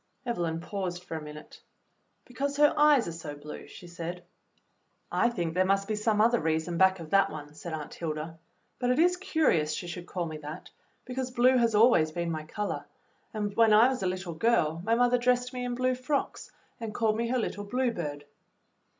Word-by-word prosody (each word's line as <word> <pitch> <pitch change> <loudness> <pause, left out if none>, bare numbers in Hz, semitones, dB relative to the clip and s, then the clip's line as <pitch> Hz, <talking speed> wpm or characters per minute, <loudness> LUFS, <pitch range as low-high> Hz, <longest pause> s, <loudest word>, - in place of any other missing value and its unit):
Evelyn 170 -9 -1
paused 180 -1 -4
for 165 - -6
a 160 - -4
minute. 150 0 -11 0.6
"Because 280 +3 -3
her 295 0 +5
eyes 295 -6 +5
are - - -3
so 160 -3 -7
blue," 150 +1 -9
she - - -12
said. 175 0 -6 0.9
"I 235 - +3
think 175 -8 -3
there 185 +2 +3
must 195 +1 +1
be 215 - -1
some 215 0 +1
other 235 +2 +4
reason 160 +2 -1
back 190 0 +4
of 160 -2 -9
that 195 0 +4
one," 150 -1 -8
said 165 +3 -8
Aunt 155 -2 -6
Hilda; 160 0 -5 0.4
"but 245 - 0
it 250 - +2
is 355 +3 +4
curious 315 - +1
she 175 - -4
should 175 0 -7
call 180 -2 -3
me 155 -1 -6
that, 150 +3 -9 0.3
because 255 0 -3
blue 250 +1 +4
has 235 -3 +3
always 210 -8 +5
been 170 +1 -2
my 155 -1 -4
color, 205 +5 -4 0.5
and 210 -2 -3
when 225 -2 +5
I 225 +4 +7
was 260 -1 -3
a 185 - 0
little 180 -1 -3
girl 165 -4 +1
my 225 +3 +2
mother 245 +1 +3
dressed 250 +1 +1
me 250 0 -4
in 245 0 -2
blue 255 +1 +1
frocks 255 +3 -2 0.3
and 225 -2 -6
called 220 -2 +2
me 235 +1 -1
her 255 +2 0
little 205 -3 -3
Blue 250 +3 0
Bird." 145 -7 -5
200 Hz, 205 wpm, -29 LUFS, 165-245 Hz, 0.9 s, I